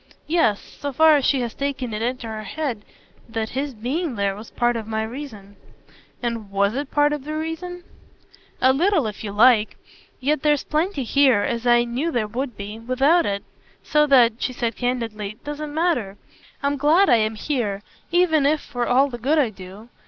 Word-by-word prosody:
"Yes 305 -11 +2
so 285 - -7
far 315 +2 +5
as 275 - -1
she 270 -3 +2
had 235 -2 -4
taken 265 -4 -2
it 210 - -3
into 245 +1 -2
her 220 -1 -5
head 240 -1 -4 0.5
that 225 -1 -3
his 275 0 -3
being 265 +6 -2
there 200 -1 0
was 215 +2 -10
part 240 0 0
of 225 -2 -4
my 220 0 -1
reason." 220 -5 -8 0.7
"And 230 -4 -3
WAS 200 +1 +1
it 280 +2 -3
part 295 0 +2
of 295 -1 -5
your 310 0 -3
reason?" 350 +3 -5 0.8
"A 260 0 +5
little 330 - +2
if 210 0 -5
you 205 - -4
like. 220 +1 +4 0.4
Yet 285 +2 0
there's 295 -2 +2
plenty 310 -1 -1
here 260 -3 +3
as 235 0 -2
I 240 0 +5
knew 245 +7 -2
there 235 -6 0
would 245 +2 -4
be 205 +2 -7
without 270 +8 +2
it. 200 0 -2 0.4
So 300 0 +3
that," 240 -4 +4
she 255 - -1
said 235 -3 -2
candidly, 225 -4 -3
"doesn't 295 0 -5
matter. 295 - 0 0.5
I'm 285 0 0
glad 310 +8 +4
I 240 - +5
am 220 0 0
here: 215 -6 -2 0.3
even 325 -5 +3
if 305 +1 +2
for 245 -4 -4
all 265 +3 +4
the 240 -3 -7
good 285 +7 +1
I 265 -7 +2
do 195 +3 -12
250 Hz, 190 wpm, -22 LUFS, 220-295 Hz, 0.8 s, far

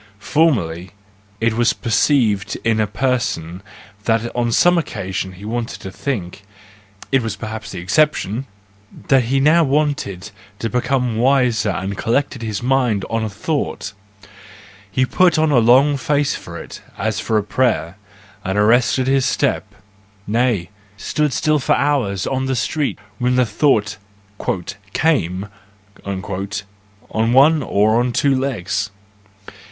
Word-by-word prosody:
Formerly 100 - +1 0.5
it 115 0 +1
was 120 +1 +2
perceived 110 -4 +1
in 115 -1 +1
a 105 - +2
person 105 -8 -2 0.4
that 115 +1 0
on 120 -1 0
some 175 +8 +4
occasion 95 - -4
he 95 +3 -11
wanted 115 +1 -3
to 95 - -7
think—it 100 +1 -5
was 115 -3 -3
perhaps 110 0 -6
the 95 - -7
exception 120 - +1 0.2
!—that 100 +6 -1
he 135 +3 +1
now 155 +5 +5
wanted 135 - -1 0.3
to 115 +1 -3
become 125 -2 0
wiser 125 -4 +2
and 95 0 -3
collected 125 +2 0
his 110 -1 -4
mind 125 -6 +1
on 115 -1 0
a 110 - -2
thought: 105 -1 -3 1.0
he 130 +6 +1
put 175 +4 +3
on 155 -1 +2
a 130 - +5
long 130 +5 +5
face 145 +1 +1
for 85 0 -8
it, - - -9 0.2
as - - -1
for 110 - 0
a 105 - +1
prayer, 105 -7 0 0.5
and 95 +1 -2
arrested 120 +4 +3
his 135 0 +2
step—nay, 100 0 -2 0.3
stood 150 +7 -1
still 155 +3 +1
for 135 - +2
hours 125 -11 0
on 130 0 -1
the 130 - 0
street 145 +4 -1 0.2
when 125 0 +1
the 125 0 +4
thought 105 -2 +1 1.0
"came"—on 100 - 0 1.8
one 150 +4 +6
or 110 -1 +2
on 125 0 0
two 140 +3 +2
legs. 105 -7 -2
115 Hz, 130 wpm, -19 LUFS, 100-135 Hz, 1.8 s, one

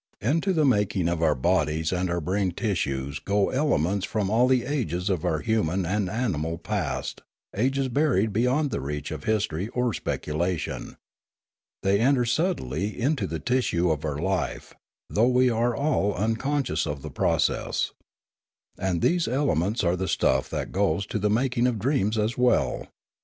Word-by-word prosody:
Into 160 - +1
the 160 -4 +2
making 100 -8 +2
of 85 -1 -1
our 80 -3 +3
bodies 80 +2 +1
and 90 0 -1
our 85 0 0
brain 95 +2 -1
tissues 70 - -2
go 100 0 +1
elements 100 - +1
from 105 -1 -1
all 120 +3 +4
the 130 -2 +2
ages 100 - -1
of 90 -5 -1
our 80 -2 0
human 95 -5 0
and 95 +2 0
animal 85 -8 -1
past, - - -3 0.3
ages 135 +5 +1
buried 120 -6 +1
beyond 130 +6 +1
the - - -2
reach 75 +1 -4
of 75 -2 -6
history 105 -4 0
or 125 -1 -1
speculation. 85 +2 -3 0.9
They 100 +1 +3
enter 125 +1 +3
subtly 110 - -1
into 130 -5 0
the 80 - -3
tissue 90 - +1
of 75 -1 -2
our 75 -2 -2
life, 90 +1 -2 0.3
though 115 +3 +2
we 125 0 +4
are 115 +1 +1
all 110 -9 +1
unconscious 115 - 0
of 75 -2 -4
the - - -6
process. - - 0 0.9
And 90 -3 -1
these 175 -1 +2
elements 120 - +1
are 85 0 +2
the 95 +1 -2
stuff 65 -6 +1
that - - -4
goes 95 -1 +1
to 105 - -3
the 105 +1 +1
mak 120 +3 +1
ing 120 - +4
of 120 -3 0
dreams 110 -2 0
as 110 +2 0
well. 125 0 +1
100 Hz, 165 wpm, -26 LUFS, 85-125 Hz, 0.9 s, all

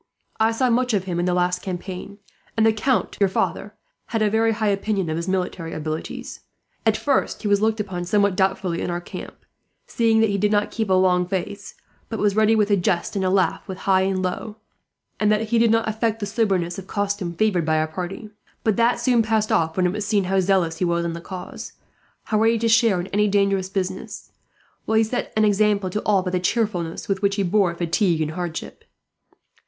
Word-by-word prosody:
I 220 +1 +3
saw 245 +2 +1
much 250 -1 +2
of 195 - 0
him 175 -2 -3
in 175 - 0
the 180 - +1
last 180 0 +1
campaign; 185 +1 -6 0.4
and 220 - +4
the 225 - +4
count, 250 +3 0
your 200 -2 +3
father, - - -2 0.3
had 225 -2 0
a 210 - +2
very 225 +1 +3
high 215 -1 0
opinion 195 -3 -1
of - - -1
his 170 +2 -3
military 180 -3 -2
abilities. 155 +1 -5 0.5
At 215 -1 +3
first 280 -4 0
he - - -1
was 205 0 +3
looked 220 0 +1
upon 185 -4 -3
somewhat 200 +1 +2
doubtfully 190 -2 0
in - - -2
our 175 0 -2
camp, 175 - -9 0.5
seeing 225 -1 +2
that 220 -2 +3
he 200 - -1
did 210 +1 +2
not 205 -1 +1
keep 220 -3 -2
a - - +3
long 180 -1 +3
face, 200 +2 -4 0.3
but 225 - -3
was 205 -1 +1
ready 220 +1 +4
with 210 -1 +2
a - - +6
jest 175 +1 -1
and 195 - 0
a 185 - +2
laugh 190 +1 +1
with 190 -2 -6
high 190 -1 +4
and 190 0 0
low, 195 +4 -3 0.6
and 210 0 +3
that 215 +1 0
he 235 0 +3
did 230 0 +4
not 225 0 +2
affect 220 0 -1
the 205 - -2
soberness 195 -4 0
of 190 - -11
costume 200 -4 -2
favoured 190 -2 +1
by 160 0 +2
our 155 0 +1
party; 185 +6 -6 0.3
but 220 -3 +1
that 235 +1 +3
soon 245 -3 +3
passed 220 -1 0
off, 160 +1 +1
when 185 - +2
it 180 - +1
was 210 0 -3
seen 205 -1 +1
how 190 +1 +1
zealous 180 -4 +1
he - - 0
was 170 0 0
in 170 - -2
the 170 - -7
cause, 180 +1 -8 0.5
how 215 - 0
ready 225 +1 +3
to 230 +1 0
share 225 -4 +4
in 175 - -3
any 210 +1 +3
dangerous 195 -2 +1
business; 190 -1 -4 0.5
while 220 - +1
he 220 - +5
set 235 +3 -3
an 215 - +4
example 205 -2 +2
to 210 - -2
all, 200 -3 +3
by 180 - -3
the 180 - 0
cheerfulness 180 -4 -1
with 195 -1 -1
which 200 -1 +1
he 200 - 0
bore 185 -2 +2
fatigue 170 0 +1
and 155 -1 -1
hardship. 170 -1 -6
200 Hz, 225 wpm, -22 LUFS, 180-215 Hz, 0.6 s, a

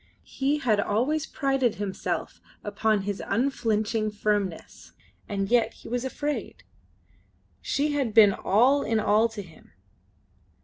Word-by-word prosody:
He 275 +2 -1
had 230 -8 +1
always 255 +10 0
prided 270 -4 0
himself 200 -2 -4 0.2
upon 210 0 0
his 200 0 -3
unflinching 225 -4 0
firmness. 200 - -3 0.4
And 195 -1 -2
yet 235 +1 +2
he - - -12
was 245 +1 -2
afraid. 290 +3 -4 1.0
She 295 +2 0
had 275 -6 -1
been 210 -2 +7
all 250 +11 +3
in 225 -3 0
all 215 +2 +3
to 210 -2 -7
him. 165 -4 -18
220 Hz, 125 wpm, -26 LUFS, 205-265 Hz, 1.0 s, been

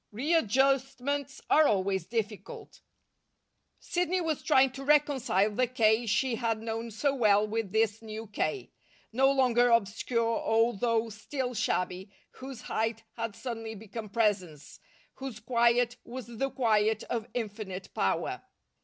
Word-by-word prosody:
Readjustments 275 +1 +1
are 310 -1 +5
always 190 -3 0
difficult. 220 -3 -5 1.0
Sidney 360 +1 -1
was 325 -4 -1
trying 265 0 +4
to 270 +1 -8
reconcile 270 -8 +2
the 250 +4 +1
K. 230 -1 +2
she 230 +4 +1
had 225 -2 -1
known 225 +1 -4
so 270 +6 0
well 210 -5 +4
with 220 -2 -3
this 220 0 +1
new 220 0 -7
K., 220 - -3 0.4
no 270 +3 +4
longer 245 -3 +3
obscure, 230 +1 +1
although 225 0 +1
still 245 +5 -4
shabby, 185 -2 -2 0.2
whose 260 -2 -9
height 225 0 -2
had 230 -3 -4
suddenly 225 -3 -5
become 215 +1 -8
presence, 190 -9 -1 0.4
whose 265 -4 -6
quiet 235 +1 +2
was 250 +1 -7
the 240 +3 -3
quiet 220 -4 +1
of 230 -2 -3
infinite 205 -5 -5
power. 95 - -1
230 Hz, 125 wpm, -29 LUFS, 215-260 Hz, 1.0 s, are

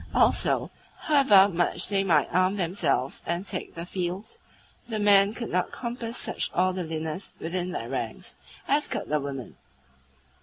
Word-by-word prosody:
Also, - - +2 0.3
however 265 -11 +6
much 175 -3 0
they 195 -1 +2
might 180 -4 +3
arm 185 +2 +3
themselves 170 -8 -1
and 170 +3 -1
take - - -5
the 170 0 -5
field, 185 +2 -3 0.6
the 220 - -2
men 205 -1 +5
could 235 +1 -5
not 180 +1 +1
compass 235 -1 -5
such - - -2
orderliness 175 -2 -1
within 175 +2 -3
their 185 - -4
ranks - - -5 0.3
as 295 +2 +2
could - - -4
the 150 0 +2
women. 135 -4 -6
185 Hz, 145 wpm, -27 LUFS, 170-205 Hz, 0.6 s, however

